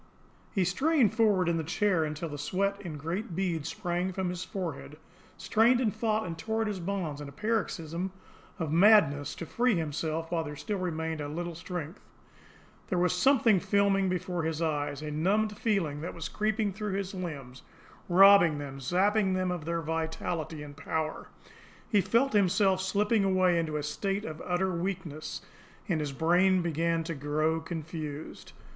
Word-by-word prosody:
He 195 - +1
strained 265 - +2
forward 205 -6 +3
in 170 -1 +2
the 160 - -1
chair 180 +1 +1
until 155 +2 -4
the 145 -1 -6
sweat 200 +6 -1
in 170 -6 -6
great 170 +5 -4
beads 165 -5 -1
sprang 180 0 -2
from 185 -1 -2
his 180 0 -4
forehead, 160 -5 -5 0.4
strained 235 +3 +3
and 220 -5 0
fought 220 -1 0
and 170 -2 -4
tore 220 +7 -2
at - - -2
his 205 -3 -3
bonds 170 -5 -3
in 145 - -7
a - - -11
paroxysm 185 -4 -2 0.5
of 160 -3 -3
madness 160 -6 +5
to 170 - -6
free 240 +5 +1
himself 160 0 -2
while 165 -2 0
there 150 -1 -6
still 205 +6 -3
remained 160 -3 -2
a 145 - -3
little 170 +3 -4
strength. 170 0 -6 0.9
There 180 - -1
was 180 -1 +2
something 225 +1 +4
filming 195 0 +2
before 180 -1 -2
his 160 -1 -2
eyes, 145 -2 -1
a 150 - -4
numbed 205 +8 +1
feeling 190 -10 -1
was 165 0 -5
creeping 215 -1 0
through 210 0 -4
his 195 0 -3
limbs, 145 -9 -6 0.5
robbing 185 -3 +7
them, 140 -1 -6
sapping 190 - +2
them 185 -1 0
of 175 -4 -4
their 170 0 -1
vitality 160 0 -3
and 145 -1 -10
power. 155 +1 -3 0.6
He 205 -3 +3
felt 230 +8 +2
himself 195 -1 +3
slipping 205 +3 +1
away 185 -2 +3
into 155 -2 -2
a 150 - -3
state 195 +7 -2
of 155 0 -6
utter 185 +1 0
weakness, 170 -4 -4 0.4
and 175 -6 0
his 150 -2 -2
brain 180 +5 +3
began 165 0 0
to 165 +1 -4
grow 155 +2 0
confused. 160 -2 -6
175 Hz, 170 wpm, -29 LUFS, 160-200 Hz, 0.9 s, robbing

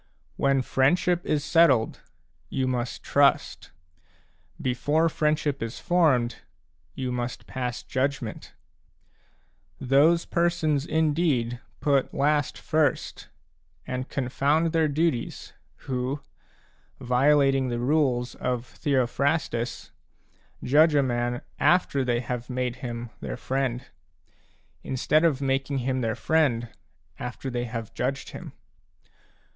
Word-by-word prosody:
When 135 -1 +2
friendship 175 +8 +2
is 145 -2 +1
settled, 155 -8 +3 0.5
you 130 - -1
must 125 -1 -3
trust; 140 -1 +2 0.9
before 145 +6 +1
friendship 150 -2 0
is 115 +2 -4
formed, 140 -10 +2 0.6
you 130 -1 -3
must 125 0 -4
pass 125 -2 -4
judgment. 130 -4 -3 1.2
Those 145 +6 +4
persons 170 -4 0
indeed 150 -7 +1 0.2
put 140 -3 +1
last 145 0 +1
first 155 -2 -1 0.6
and 130 +1 -4
confound 145 +5 +1
their 160 -1 +3
duties, 150 -4 -1 0.3
who, 130 +2 -2 0.8
violating 135 +1 +3
the 120 - -2
rules 125 -2 +1
of 125 -1 -2
Theophrastus, 130 -2 -1 0.7
6 - - -6
judge 155 +2 +6
a 140 - +4
man 120 -1 -1 0.2
after 145 -2 +3
they 120 -1 0
have 125 0 -5
made 125 -1 -2
him 120 -2 -6
their 65 -4 -5
friend, 130 -2 -2 1.0
instead 150 +4 +1
of 150 -5 +2
making 135 +1 0
him 130 -1 0
their 115 -2 -1
friend 135 -8 +1 0.5
after 130 +2 -5
they 120 0 -2
have 115 -2 -6
judged 135 +2 -2
him. - - -9
135 Hz, 110 wpm, -26 LUFS, 125-150 Hz, 1.2 s, judge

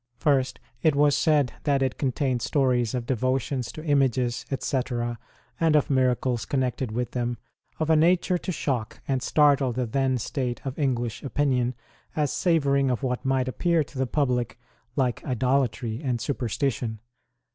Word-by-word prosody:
First, 130 -4 +1 0.2
it 155 -3 +3
was 145 0 +4
said 145 -6 +2
that 140 -2 +2
it 130 - -2
contained 130 -2 0
stories 125 -3 +1
of 120 -2 -2
Devotions 130 +1 -1
to 155 - -8
images, 130 -5 +1
etc., 120 -3 -2 0.4
and 160 -2 +3
of 145 -1 +2
miracles 125 -3 +1
connected 130 0 -1
with 120 +1 -2
them, 120 -1 -2 0.4
of 160 0 +1
a - - +6
nature 175 +3 +3
to 185 - -4
shock 130 -9 -2
and 135 -2 0
startle 145 -3 +3
the 125 +1 -1
then 130 +2 +1
state 125 +1 -3
of 135 +2 -4
English 120 -4 -1
opinion, 130 -3 0 0.4
as 150 -3 0
savouring 140 -6 +2
of 125 +2 -1
what 125 -1 -1
might 130 -1 +1
appear 165 +4 +1
to 140 -2 -10
the 130 - +1
public 125 -4 0 0.4
like 130 -4 0
idolatry 125 -2 0
and 125 -4 0
superstition. 120 -2 -2
130 Hz, 155 wpm, -26 LUFS, 125-140 Hz, 0.4 s, a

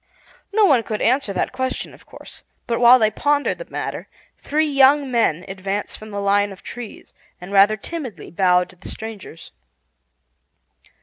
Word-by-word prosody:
No 425 0 +4
one 275 -10 +4
could 215 -2 -4
answer 255 -2 +1
that 185 - -2
question, 260 0 -3
of - - -19
course; - - -11 0.2
but 230 - -1
while 245 +1 +8
they 215 -3 +2
pondered 290 - 0
the - - -9
matter - - -5 0.3
three 310 +2 0
young 275 -1 +4
men 185 -8 +1
advanced 195 +1 -4
from 215 - -11
the 200 -1 -5
line 200 0 +2
of 195 - -13
trees, 240 -3 -9 0.3
and 180 +2 -10
rather 200 +2 +5
timidly 270 -1 -7
bowed 180 0 +2
to 185 - -16
the - - -11
strangers. 215 -6 -9
220 Hz, 165 wpm, -21 LUFS, 195-265 Hz, 0.3 s, while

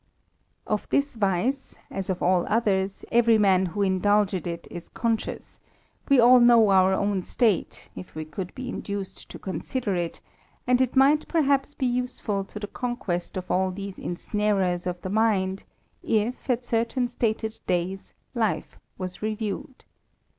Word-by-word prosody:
f 210 -1 -2
this 285 +1 +1
vice, 225 +5 -1
as 195 -1 -4
of 185 - -2
all 180 -1 +3
others, 200 -3 0
every 235 -1 +5
man 190 -3 +4
who 200 +4 -1
indulges 195 -1 +2
it 170 0 -5
is 175 -1 -8
icious: 230 -1 -3 0.5
we 275 -2 +6
all 245 +1 +8
know 235 -3 +6
our 190 0 +5
own 200 0 +1
state, 215 0 0
if 180 - -10
we 155 0 -4
could 175 +4 -6
be 255 -1 -5 0.3
ced 190 - -14
to - - -8
consider 205 +2 -3
it; 175 -1 -3 0.5
and 250 +1 +3
it 255 0 0
might 280 +3 +4
perhaps 285 -3 +1
be 265 - -1
useful 245 -5 -1
to 210 - -9
:onquest 205 -6 -3
of 185 -1 -5
all 190 +1 +2
these 195 +1 -7
ensnarers 185 -1 -1
of 180 0 -3
the 185 - -5
mind, 200 -3 +1 0.4
if, 225 +5 -1
at 245 0 0
certain 235 +2 0
d 235 -2 0 0.3
days, 180 +2 -2 0.2
life 225 -4 -1 0.2
was 185 -1 -6
reviewed. 215 +3 -4
205 Hz, 150 wpm, -26 LUFS, 185-240 Hz, 0.5 s, all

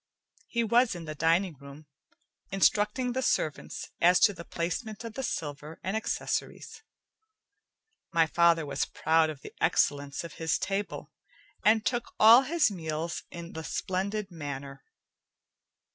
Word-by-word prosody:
He 235 -1 0
was 235 0 +3
in 170 -2 -7
the 155 - -5
dining 165 +4 +2
room, 140 +2 -12 0.7
instructing 210 +6 +2
the 260 +2 -1
servants 155 - -2
as 180 +1 +6
to 205 - +6
the 170 -2 -9
placement 205 +7 -4
of 230 -2 -7
the 265 - -4
silver 150 - -5
and 190 +3 -2
accessories. 220 - -3 1.3
My 165 -1 +4
father 165 0 +3
was 140 -1 -1
proud 160 0 +2
of 150 -3 -7
the - - -10
excellence 145 -3 +1
of 170 - -8
his 160 0 +1
table, 200 +1 -3 0.5
and 220 +1 +4
took 240 0 -2
all 230 +4 +9
his 300 -3 +2
meals 160 -2 -4
in 170 0 -9
the 160 - -6
splendid 195 +4 -3
manner. 140 -4 -7
170 Hz, 140 wpm, -29 LUFS, 155-215 Hz, 1.3 s, all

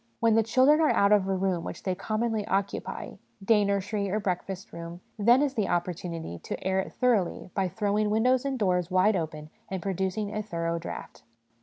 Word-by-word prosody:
When 230 -1 +4
the 225 - +5
chil 230 +4 +3
dren 300 +3 +5
are 310 - +4
out 200 0 +3
of 200 -2 +4
a 195 - +1
room 185 -3 0
which - - -7
they 185 - 0
commonly 220 +3 -1
occupy, 195 +1 -3 0.3
day 210 -1 +5
nursery 200 0 -1
or 210 +3 0
breakfast 190 0 -4
room, 170 +1 -7 0.2
then 240 +6 +5
is 280 -2 0
the 215 -7 0
opportunity 170 - -3
to - - -6
air 190 0 +2
it 190 - -3
thoroughly 215 -7 0
by 195 -2 0
throwing 210 +2 0
windows 245 +4 +3
and 275 -1 -2
doors 180 -5 +1
wide 185 +3 +3
open 155 -3 -4 0.2
and 190 - -3
producing 195 +3 -2
a 215 - -1
thorough 170 -4 -2
draught. 170 - -8
200 Hz, 195 wpm, -28 LUFS, 180-220 Hz, 0.3 s, the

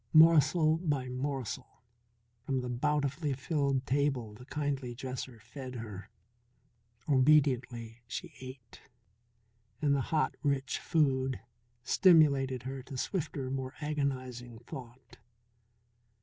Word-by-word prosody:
Morsel 160 0 +6
by 145 -7 -1
morsel 130 -3 -4 0.6
from 130 0 -1
the 125 - -4
bountifully 145 +3 0
filled 140 -1 0
table 135 -5 0
the 125 +4 -12
kindly 140 -4 -2
dresser 130 -1 -6
fed 125 +3 -8
her. 105 -3 -7 1.0
Obediently 130 -5 +3
she - - -6
ate, 130 -3 -11 1.0
and 145 -1 +2
the 140 - +2
hot, 155 -2 +2
rich 140 -3 0
food 135 -5 +1 0.4
stimulated 140 - +4
her 135 +1 -5
to 130 +1 -8
swifter, 140 -4 -2
more 130 0 -3
agonizing 130 -5 -3
thought. 125 +1 -11
135 Hz, 105 wpm, -32 LUFS, 125-145 Hz, 1.0 s, Morsel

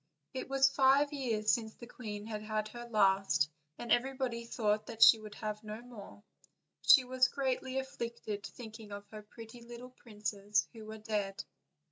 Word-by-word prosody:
It 260 0 -5
was 270 0 +5
five 275 +2 +4
years 225 -6 +1
since 220 -2 -1
the 240 - -10
queen 210 -4 -7
had 215 -1 -5
had 215 0 -2
her 240 +2 -8
last, 195 -8 +3 0.3
and 240 -2 -6
everybody 250 -1 0
thought 215 -2 0
that 225 - -8
die 225 - -10
would 215 -1 -10
have 215 0 -5
no 215 +1 -6
more, 240 -4 -11
and 205 - -19 0.6
she 265 - +8
was 255 0 +3
greatly 260 0 -2
afflicted 235 -5 -4
thinking 220 -3 -9
of 200 0 -7
her 215 -1 -8
pretty 225 +2 -12
little 240 +2 -10
princes 210 -3 -2
who 220 -2 -10
were 220 0 -7
dead. 210 -3 -3
225 Hz, 170 wpm, -33 LUFS, 210-250 Hz, 0.6 s, she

